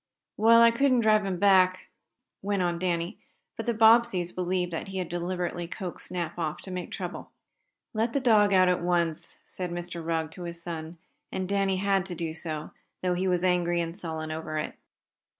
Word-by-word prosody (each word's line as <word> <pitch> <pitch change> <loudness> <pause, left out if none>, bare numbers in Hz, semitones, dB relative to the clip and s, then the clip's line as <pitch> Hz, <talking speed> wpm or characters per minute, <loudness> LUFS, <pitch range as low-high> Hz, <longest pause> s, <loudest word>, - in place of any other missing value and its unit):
"Well, 230 +2 +6
I 230 - +7
couldn't 255 0 +3
drive 215 -2 +3
him 185 -2 -2
back," 185 -1 +3 0.5
went 200 -1 0
on 175 -1 -1
Danny, 175 +1 -2 0.4
but - - -6
the 235 - +2
Bobbseys 220 -5 +5
believed 180 -1 -1
that 165 - -4
he 195 0 -6
had 180 -3 -3
deliberately 175 0 -3
coaxed 180 0 -6
Snap 175 -2 -4
off 155 -2 -2
to 190 - -8
make 180 -1 -4
trouble. - - -6 0.6
"Let 225 +2 0
the 280 - +2
dog 215 -5 +4
out 185 -1 +5
at 180 -1 +2
once," 170 -2 -1
said 180 -1 -5
Mr. 175 -1 -5
Rugg 160 -1 -1
to 175 +1 -8
his 170 0 -6
son, 170 -1 -6 0.3
and 185 -1 -3
Danny 195 -1 +1
had 195 -1 +1
to 180 - -5
do 165 -1 -3
so, 155 -2 -5 0.3
though 180 -1 +2
he 185 +2 -1
was 180 -1 +1
angry 175 -1 +2
and 165 0 -3
sullen 160 -4 -5
over 155 0 -4
it. 150 - -3
180 Hz, 190 wpm, -27 LUFS, 170-195 Hz, 0.6 s, I